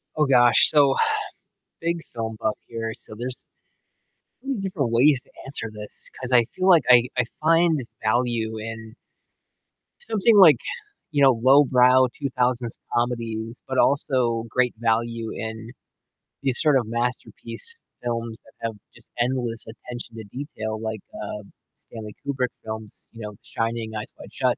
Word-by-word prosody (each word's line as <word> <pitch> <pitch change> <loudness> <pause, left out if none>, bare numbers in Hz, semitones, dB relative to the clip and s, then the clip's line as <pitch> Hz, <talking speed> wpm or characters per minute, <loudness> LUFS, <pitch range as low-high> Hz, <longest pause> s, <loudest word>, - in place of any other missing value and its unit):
Oh 150 - +3
gosh, 120 -2 +6
so, 140 -3 +5 0.9
big 170 0 -1
film 115 -1 -4
buff 110 -1 0
here, 115 -1 -4
so, 110 - -13
there's 125 +3 -6 1.0
many 265 -6 -3
different 170 - -2
ways 130 +3 +5
to - - -28 0.2
answer 135 -5 -3
this 105 -1 -11
'cause 130 0 -7
I 120 -2 +5
feel 185 - 0
like 170 -3 +6
I 125 -1 +7
I 125 - +2 0.2
find 165 0 +4
the 130 - -5 0.2
value 110 -1 0
in 110 +1 -7 1.0
something, 220 - +2
like, 170 -7 +8 0.6
you 145 -1 +2
know, 135 -4 +5
lowbrow 130 -1 +6
2000s 125 -4 -1 0.2
comedies, 115 -1 -2
but 130 - -2
also 125 -5 +2
great 125 +1 +1
value 115 0 -1
in 110 0 -6 0.7
these 135 -3 +6
sort 150 -3 +5
of 125 - +1
masterpiece 125 - -3 0.3
films 115 -2 -3
that 110 - -20
have 115 - -6 0.2
just - - -19
endless 120 -2 -1
attention 120 +1 -9
to 110 - -7
detail 110 -6 -5
like, 110 -1 -4
uh, 105 0 -6 0.3
Stanley 110 -2 -10
Kubrick 135 -3 0 0.2
films, 110 -1 -6 0.2
you 115 - -12
know, 105 -1 -6
The 100 - -17
Shining, 115 -1 -3
Eyes 105 - -4
Wide - - -12
Shut, - - +1
120 Hz, 150 wpm, -24 LUFS, 115-135 Hz, 1.0 s, like